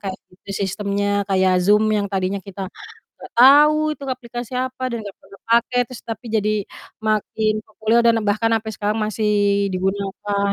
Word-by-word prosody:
kayak 190 -2 -5 0.2
gitu 185 - -14
sistemnya 200 +1 -2 0.2
kayak 185 -1 +3
Zoom 210 +4 +4
yang 205 -1 +1
tadinya 195 0 -2
kita 195 0 -7 0.5
gak - - -13
tau 290 +5 +7
itu 280 - -9
aplikasi 245 -2 -6
apa 260 0 -5
dan 235 - -3
gak 200 - -9
pernah 195 +1 -17
pakai, 235 +2 +2
terus 255 -3 -10
tapi 230 +1 -7
jadi 215 0 +1 0.5
makin 215 0 0
populer 220 +2 +1
dan 230 -1 +4
bahkan 225 +2 +1
sampe 220 0 0
sekarang 210 +2 -2
masih 215 0 -2 0.5
digunakan 200 +1 -1
215 Hz, 160 wpm, -21 LUFS, 200-230 Hz, 0.5 s, tau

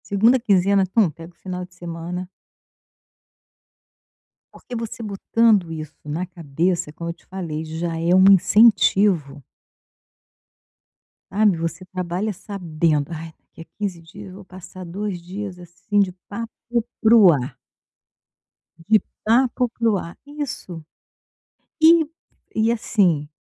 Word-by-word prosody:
Segunda 225 +6 +4
quinzena, 200 -3 +3
tum, 190 0 +2
pega 165 +3 -12
o - - -41
final 180 -1 -6
de 180 0 -23
semana 175 +1 -6 2.3
Porque, 245 - -10
você 230 0 -5
botando 210 -2 +2
isso 155 -1 -7
na 155 +5 -3
cabeça 170 0 -2
é - - -11
como 170 +1 -6
eu - - -3
te 170 - -28
falei, 165 -5 -5
já 165 +1 -4
é 170 +2 +1
um 190 +1 +6
incentivo. 195 -6 +4 1.9
Sabe, 205 -2 +3
você 165 +2 -4
trabalha 185 +3 -3
sabendo: 165 -6 -1
"Ai, 165 0 -7 0.2
daqui - - -14
a - - -10
15 195 -5 -3
dias, 195 +5 -12
eu 185 - -11
vou 200 - -11
passar 185 0 -11
2 185 +1 -4
dias, 190 +1 -7
assim, 175 +4 -1
de 190 -2 +1 0.2
papo 230 +3 -5 0.6
para 225 0 +6
o 200 -6 +8
ar". 135 -3 -2 1.3
De 215 0 +5 0.2
papo 245 +2 +2
para 230 0 0
o 200 - +1
ar. 170 -2 -8
Isso. 285 - -6 1.0
E 325 0 +6 0.5
e, 220 +1 +2
assim, 180 -10 +1
185 Hz, 135 wpm, -22 LUFS, 165-210 Hz, 2.3 s, o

